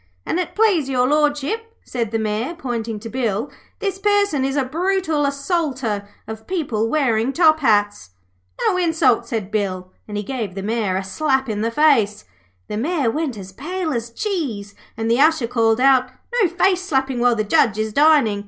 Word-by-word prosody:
'An' 350 Hz, -, -1 dB
it 360 Hz, -, -4 dB
please 390 Hz, -10 st, +2 dB
Your 250 Hz, -2 st, +2 dB
Lordship,' 300 Hz, -, 0 dB
said 235 Hz, -3 st, -3 dB
the 225 Hz, -, -1 dB
Mayor, 220 Hz, +8 st, -2 dB
pointing 230 Hz, -6 st, -4 dB
to 225 Hz, -, -7 dB
Bill, 230 Hz, 0 st, -2 dB, 0.3 s
'this 390 Hz, -2 st, -3 dB
person 405 Hz, -8 st, +2 dB
is 270 Hz, +1 st, -1 dB
a 275 Hz, -2 st, +1 dB
brutal 330 Hz, 0 st, 0 dB
assaulter 275 Hz, -, -2 dB, 0.2 s
of 220 Hz, 0 st, -8 dB
people 245 Hz, -, -1 dB
wearing 240 Hz, -4 st, +1 dB
top 315 Hz, 0 st, +4 dB
hats.' 205 Hz, -, +1 dB, 0.6 s
'No 365 Hz, -, +2 dB
insults,' 320 Hz, -9 st, +2 dB
said 210 Hz, -4 st, -3 dB
Bill, 185 Hz, -3 st, -2 dB, 0.2 s
and 210 Hz, -1 st, -5 dB
he 205 Hz, -, -2 dB
gave 220 Hz, -5 st, -4 dB
the 195 Hz, -, -5 dB
Mayor 215 Hz, -3 st, -1 dB
a 195 Hz, -, -2 dB
slap 265 Hz, +7 st, 0 dB
in 210 Hz, -2 st, -2 dB
the 225 Hz, -, 0 dB
face. 230 Hz, -6 st, +2 dB, 0.4 s
The 210 Hz, -, -4 dB
Mayor 280 Hz, -1 st, 0 dB
went 290 Hz, -3 st, -3 dB
as 190 Hz, -1 st, -9 dB
pale 320 Hz, -, -4 dB
as 235 Hz, -1 st, -3 dB
cheese, 235 Hz, -, -3 dB, 0.2 s
and 225 Hz, -, -3 dB
the 235 Hz, +2 st, +2 dB
Usher 315 Hz, -4 st, +4 dB
called 225 Hz, -1 st, +1 dB
out: 260 Hz, -1 st, +4 dB, 0.3 s
'No 380 Hz, -, +3 dB
face 365 Hz, +1 st, +2 dB
slapping 265 Hz, -7 st, -1 dB
while 245 Hz, 0 st, +3 dB
the 215 Hz, -, 0 dB
judge 210 Hz, 0 st, +2 dB
is 215 Hz, 0 st, -2 dB
dining!' 285 Hz, -8 st, +4 dB
255 Hz, 180 wpm, -20 LUFS, 220-315 Hz, 0.6 s, top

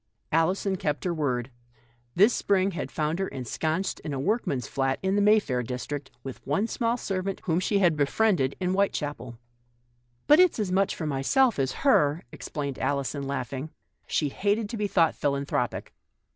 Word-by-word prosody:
Alison 185 Hz, +4 st, +1 dB
kept 150 Hz, -4 st, -2 dB
her 180 Hz, -, 0 dB
word. 130 Hz, -5 st, -1 dB, 0.6 s
This 205 Hz, +7 st, +5 dB
spring 195 Hz, -1 st, +1 dB
had 175 Hz, -, -4 dB
found 155 Hz, +2 st, -1 dB
her 195 Hz, -, 0 dB
ensconced 155 Hz, +8 st, -2 dB
in 150 Hz, -, -5 dB
a -, -, -3 dB
workman's 145 Hz, -, -1 dB
flat 135 Hz, -1 st, 0 dB
in 190 Hz, +1 st, +1 dB
the 205 Hz, -, +3 dB
Mayfair 205 Hz, -12 st, +3 dB
district, 130 Hz, +3 st, -5 dB
with 135 Hz, -2 st, -8 dB
one 150 Hz, +10 st, 0 dB
small 230 Hz, +1 st, -1 dB
servant 195 Hz, -3 st, -3 dB
whom 170 Hz, -1 st, +1 dB
she 200 Hz, +2 st, +1 dB
had 175 Hz, -6 st, +3 dB
rescued 145 Hz, -2 st, +2 dB
in 180 Hz, -1 st, 0 dB
Whitechapel. 145 Hz, -11 st, -1 dB, 0.9 s
"But 300 Hz, +3 st, +6 dB
it's 365 Hz, -1 st, +5 dB
as 205 Hz, -5 st, -1 dB
much 195 Hz, +1 st, +2 dB
for 160 Hz, -, -4 dB
myself 150 Hz, -, +2 dB
as 130 Hz, -1 st, +1 dB
her," 150 Hz, -, +4 dB
ex -, -, -8 dB
plained 140 Hz, -3 st, -4 dB
Alison, 140 Hz, 0 st, -1 dB
laughing. 140 Hz, +2 st, -4 dB, 0.4 s
She 150 Hz, -, 0 dB
hated 205 Hz, +7 st, 0 dB
to 230 Hz, -, -4 dB
be 210 Hz, -1 st, 0 dB
thought 165 Hz, -5 st, +3 dB
philanthropic. 140 Hz, 0 st, -2 dB
160 Hz, 170 wpm, -27 LUFS, 140-200 Hz, 0.9 s, But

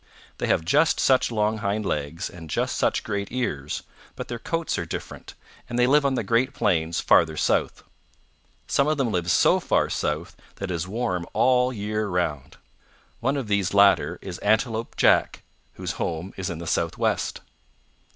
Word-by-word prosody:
"They -, -, -1 dB
have 80 Hz, -, +1 dB
just 150 Hz, -, +3 dB
such 130 Hz, -1 st, +3 dB
long 110 Hz, 0 st, 0 dB
hind 105 Hz, 0 st, -1 dB
legs, 75 Hz, +1 st, -2 dB
and 85 Hz, -2 st, -11 dB
just -, -, -1 dB
such -, -, +1 dB
great 100 Hz, -2 st, -3 dB
ears, 75 Hz, -, -3 dB, 0.3 s
but -, -, -7 dB
their 120 Hz, -, -4 dB
coats 165 Hz, +6 st, -2 dB
are -, -, -2 dB
different, -, -, -7 dB, 0.3 s
and 120 Hz, -, -3 dB
they 125 Hz, -, +4 dB
live 140 Hz, +2 st, +4 dB
on 135 Hz, -, 0 dB
the 120 Hz, -, -1 dB
great 120 Hz, +6 st, +1 dB
plains 85 Hz, -3 st, +1 dB
farther 80 Hz, -2 st, +3 dB
south. -, -, 0 dB, 0.8 s
Some 140 Hz, -, +1 dB
of 155 Hz, 0 st, +1 dB
them 130 Hz, -5 st, 0 dB
live 90 Hz, -2 st, -1 dB
so 85 Hz, -, +4 dB
far -, -, +1 dB
south 80 Hz, +5 st, -2 dB, 0.2 s
that 100 Hz, -2 st, -5 dB
it -, -, -1 dB
is 85 Hz, +1 st, -3 dB
warm 95 Hz, -5 st, -2 dB
all 125 Hz, -1 st, +3 dB
the 125 Hz, -, -7 dB
year 105 Hz, +1 st, -2 dB
round. 80 Hz, -7 st, -2 dB, 0.6 s
One 135 Hz, +4 st, 0 dB
of 135 Hz, -, -3 dB
these 100 Hz, -2 st, 0 dB
latter 100 Hz, 0 st, +4 dB
is 90 Hz, -2 st, -6 dB
Antelope 110 Hz, +2 st, 0 dB
Jack, -, -, +3 dB, 0.3 s
whose -, -, -4 dB
home 85 Hz, +4 st, -4 dB
is 95 Hz, -1 st, -4 dB
in 85 Hz, -, -4 dB
the 85 Hz, -, -7 dB
Southwest." 85 Hz, 0 st, -1 dB
100 Hz, 180 wpm, -24 LUFS, 85-120 Hz, 0.8 s, they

